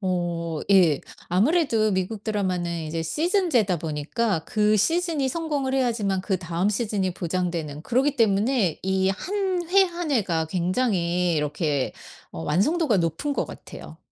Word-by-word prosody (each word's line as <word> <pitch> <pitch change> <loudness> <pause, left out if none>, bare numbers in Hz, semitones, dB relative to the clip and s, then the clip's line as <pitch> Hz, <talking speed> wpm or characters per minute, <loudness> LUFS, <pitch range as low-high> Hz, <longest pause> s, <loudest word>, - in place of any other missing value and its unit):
어 170 -4 -2
예. 170 -7 +5 0.3
아무래도 225 - +2
미국 190 +3 -2
드라마는 180 -5 -1
이제 165 +1 -3
시즌제다 300 - +1
보니까 160 +6 -1
그 210 0 +2
시즌이 325 - +1
성공을 290 -3 -2
해야지만 225 -7 0
그다음 185 -1 -1
시즌이 205 -4 -1
보장되는 170 -4 -3
그러기 265 - +1
때문에 215 - +2
이 190 0 +1
1 385 - -2 0.2
회 390 +1 +6
1 345 -3 -4
회가 180 - +1
굉장히 180 -1 0
이렇게 150 -2 -1 0.4
어 80 - -6
완성도가 235 - +2
높은 170 - -1
것 - - -1
같애요. - - -11
195 Hz, 295 characters per minute, -24 LUFS, 170-260 Hz, 0.4 s, 회